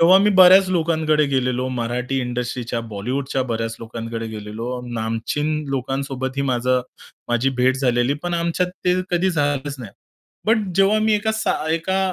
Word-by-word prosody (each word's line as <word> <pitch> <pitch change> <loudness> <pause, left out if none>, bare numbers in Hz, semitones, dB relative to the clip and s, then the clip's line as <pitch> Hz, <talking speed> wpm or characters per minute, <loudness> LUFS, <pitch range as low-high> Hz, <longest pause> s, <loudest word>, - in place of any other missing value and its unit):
तेव्हा 180 +3 +7
मी 205 +2 +3
बऱ्याच 190 0 +7
लोकांकडे 160 -3 +2
गेलेलो 130 -2 0
मराठी 125 +1 -2
इंडस्ट्रीच्या, 120 -1 -3
बॉलिवूडच्या 125 +5 -3
बऱ्याच 115 -2 -3
लोकांकडे 115 0 -5
गेलेलो. 110 +3 -5
नामचीन 115 +7 -2 0.2
लोकांसोबतही 135 0 -2
माझं 125 +1 +1 0.5
माझी 120 +3 +1
भेट 130 +1 +3
झालेली, 125 0 +1
पण 175 -1 -2
आमच्यात 170 +1 0 0.2
ते 180 - +4 0.2
कधी 180 +2 +2
झालंच 145 -3 -1
नाही. 115 -5 -8 0.6
बट 220 +1 +4 0.2
जेव्हा 195 +2 +4
मी 215 0 +3
एका 215 +1 0
साध 215 -7 -1
एका 165 +4 0
135 Hz, 145 wpm, -21 LUFS, 120-170 Hz, 0.6 s, तेव्हा